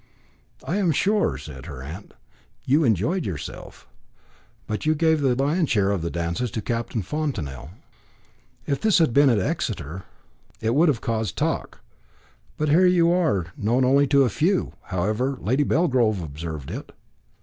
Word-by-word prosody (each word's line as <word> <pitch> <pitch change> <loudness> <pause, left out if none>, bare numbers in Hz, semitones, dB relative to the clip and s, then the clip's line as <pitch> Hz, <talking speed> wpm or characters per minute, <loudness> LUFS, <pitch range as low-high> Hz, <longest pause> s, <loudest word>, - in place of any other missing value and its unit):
"I 180 - -2
am 190 -5 +2
sure," 205 +7 +1
said - - -10
her 65 -1 -8
aunt, 85 +9 -9 0.5
"you 145 +5 +3
enjoyed 130 - +1
yourself. 85 - -7 0.8
But 105 - -4
you 155 +1 +2
gave 160 0 +2
the 130 -3 +2
lion's 145 +5 +1
share 100 -3 +2
of 100 -4 -1
the 85 - -2
dances 85 +9 -2
to 110 - -2
Captain 115 -1 -2
Fontanel. 90 - -4 1.0
If 140 - -2
this 220 -2 +4
had 160 -9 +3
been 140 +1 +5
at 115 - +3
Exeter, 90 -2 -3 0.5
it 110 +1 0
would 160 +6 +4
have 135 -7 +1
caused 110 -4 -2
talk; - - -2 0.8
but 155 0 0
here 180 +5 +5
you 170 -2 +4
are 120 - 0
known 120 +5 +1
only 140 +2 +4
to 140 0 +4
a 125 - +2
few; 170 - 0
however, 110 +9 -1
Lady 130 +7 +1
Belgrove 125 - +1
observed 80 -1 -6
it." - - -7
125 Hz, 160 wpm, -24 LUFS, 95-155 Hz, 1.0 s, been